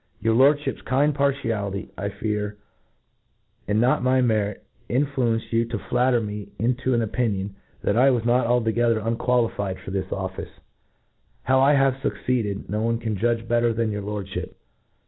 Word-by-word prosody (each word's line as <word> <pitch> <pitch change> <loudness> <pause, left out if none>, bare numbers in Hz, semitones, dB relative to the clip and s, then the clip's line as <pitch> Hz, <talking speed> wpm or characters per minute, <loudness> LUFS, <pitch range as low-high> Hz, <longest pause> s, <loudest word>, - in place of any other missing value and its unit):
Your 115 +1 +1
Lordfliip's 140 +2 +3
kind 145 +3 +2
partiality, 115 -9 -1
I 100 0 -3
fear, 105 0 -3 1.1
and 105 +2 +1
not 120 +2 +3
my 130 +1 +3
merit, 110 -5 0 0.3
influenced 125 -4 0
you 115 0 +3
to 115 -1 -4
flatter 125 +3 +1
me 105 -2 -5
into 125 +2 0
an 115 -1 +1
opinion^ 105 -4 -1 0.3
that 100 - +1
I 130 +4 +5
was 120 -3 +1
not 120 0 +3
altogether 120 -1 +2
unqualified 115 -3 0
for - - -9
this 95 -1 -2
oflSce. 95 -1 -5 1.0
^How 130 +1 +4
I 140 +2 +5
have 135 -1 +2
fucceeded, 115 -7 -2
no 105 +1 -2
one 115 +1 +1
can 110 -2 -3
judge 115 +2 0
better 120 0 +2
than 115 -1 0
your 105 0 -3
Lprdfliip. 100 -2 -5
115 Hz, 155 wpm, -24 LUFS, 105-125 Hz, 1.1 s, I